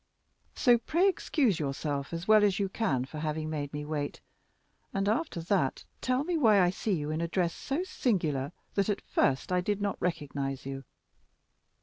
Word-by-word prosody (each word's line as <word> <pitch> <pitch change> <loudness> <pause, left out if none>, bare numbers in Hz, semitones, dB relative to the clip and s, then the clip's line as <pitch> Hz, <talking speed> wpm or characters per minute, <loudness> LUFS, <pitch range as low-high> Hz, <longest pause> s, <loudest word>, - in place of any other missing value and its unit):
So 240 -2 +5
pray 340 +10 +2
excuse 275 - +1
yourself 140 -1 -2
as 170 +2 -5
well 215 -1 +7
as 200 -2 +3
you 195 -1 0
can 140 - 0
for 150 +3 -8
having 155 0 -2
made 145 -2 -3
me 150 0 -4
wait, 150 -1 -3 0.8
and, 195 0 +1
after 225 - 0
that, 165 -6 0 0.2
tell 255 +2 +1
me 345 +1 0
why 220 -7 +6
I 180 -1 +4
see 205 +2 -1
you 150 -3 -1
in 155 +1 -1
a 170 - 0
dress 170 0 0
so 290 +6 -2
singular 160 - 0 0.2
that 200 0 +1
at 205 - 0
first 135 +6 +1
I 180 0 +3
did 205 +2 -1
not 200 -1 -2
recognize 140 -6 -2
you." 135 0 -6
175 Hz, 185 wpm, -30 LUFS, 150-215 Hz, 0.8 s, well